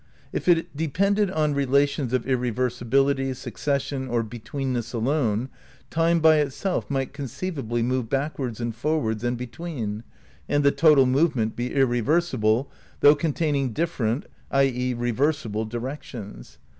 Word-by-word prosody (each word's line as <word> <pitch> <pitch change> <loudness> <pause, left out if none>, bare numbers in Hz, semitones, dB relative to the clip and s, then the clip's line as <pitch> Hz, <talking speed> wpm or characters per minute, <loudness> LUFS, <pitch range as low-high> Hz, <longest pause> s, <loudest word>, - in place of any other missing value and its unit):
If - - -3
it 170 -2 +3
de 160 +2 -1
pended 200 +6 +2
on 155 -4 +1
relations 140 -1 +1
of 130 -2 0
irreversibility, 130 +2 +1
succession, 140 0 -2
or 120 -2 0
between 120 +4 -4
ness 120 0 -3
alone, 120 -1 0 0.4
time 165 +1 +3
by 160 -1 +6
itself 150 +6 -1
might 135 -2 -2
conceivably 135 -4 -3
move 125 -1 -1
backwards 135 -4 -2
and 120 -1 -2
forwards 120 -5 -1
and 120 0 0
between, 120 -4 -5 0.5
and 145 0 +2
the 140 - +5
total 145 -2 +5
movement 130 -4 +1
be 120 +1 -2
irre 125 -3 +2
versible 130 -5 +2 0.4
though 145 - +8
containing 145 -4 0
different 130 -5 -1 0.2
(i. 135 0 +3
e. 125 -1 0
reversible) 120 -2 -1
direc 120 +6 -4
tions. 105 - -10
135 Hz, 140 wpm, -25 LUFS, 120-150 Hz, 0.5 s, though